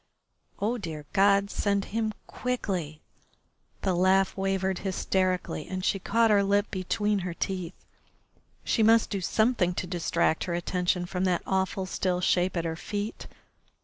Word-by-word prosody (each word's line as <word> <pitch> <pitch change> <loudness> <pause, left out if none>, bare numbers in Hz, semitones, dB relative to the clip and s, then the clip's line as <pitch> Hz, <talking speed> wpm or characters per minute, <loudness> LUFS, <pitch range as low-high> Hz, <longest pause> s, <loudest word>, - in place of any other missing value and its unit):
Oh, 225 +4 0
dear 160 -6 -6
God, 200 0 +4
send 200 -1 0
him 220 -1 0
quickly! 185 -11 -3 0.8
The 190 - +2
laugh 190 +2 +3
wavered 190 -1 -1
hysterically, 185 -3 -1
and 185 0 -4
she 195 - +1
caught 225 +4 +2
her 205 -1 +5
lip 200 +1 +1
between 205 +2 0
her 180 -2 -4
teeth. 185 -2 -3 0.9
She 225 - +1
must 225 +1 +5
do 200 -2 -2
something 215 -2 +1
to - - -2
distract 175 -2 0
her 175 - -2
attention 180 +1 0
from 180 +1 -2
that 180 -2 +1
awful 190 0 0
still 185 -1 -1
shape 180 0 +1
at 170 - -1
her 165 -1 -2
feet. 205 +6 -5
190 Hz, 150 wpm, -28 LUFS, 180-205 Hz, 0.9 s, her